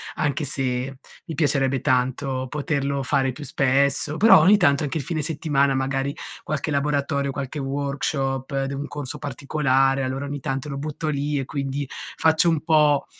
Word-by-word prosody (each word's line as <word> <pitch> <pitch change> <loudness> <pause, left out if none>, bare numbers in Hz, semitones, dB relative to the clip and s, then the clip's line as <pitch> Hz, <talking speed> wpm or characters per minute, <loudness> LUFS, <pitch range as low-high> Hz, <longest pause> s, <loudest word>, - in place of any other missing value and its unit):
anche 145 0 -1
se 130 -1 -2 0.3
mi 165 -4 -6
piacerebbe 135 -3 +1
tanto 130 0 0
poterlo 140 -2 -1
fare 130 0 +1
più 150 +4 -9
spesso. 140 +3 +1
Però, 220 -5 +8
ogni 195 +6 +6
tanto, 150 -7 +3
anche 145 +3 -2
il - - -4
fine 160 -3 -2
settimana 140 -3 +1
magari 135 +1 -1 0.3
qualche 155 0 -3
laboratorio, 140 -1 0
qualche 140 +2 -5
workshop 135 0 -2
di 140 - -4
un 140 +1 -4
corso 145 0 -5
particolare, 135 -1 +1
allora, 130 +2 -3
ogni 145 0 -4
tanto, 135 0 -3
lo 140 - -4
butto 155 +2 -4
lì 145 0 -1
e 135 - -3
quindi 140 -1 -3 0.3
faccio 160 +1 +3
un 160 -2 +1
po' 150 -3 +3
140 Hz, 165 wpm, -23 LUFS, 135-150 Hz, 0.3 s, Però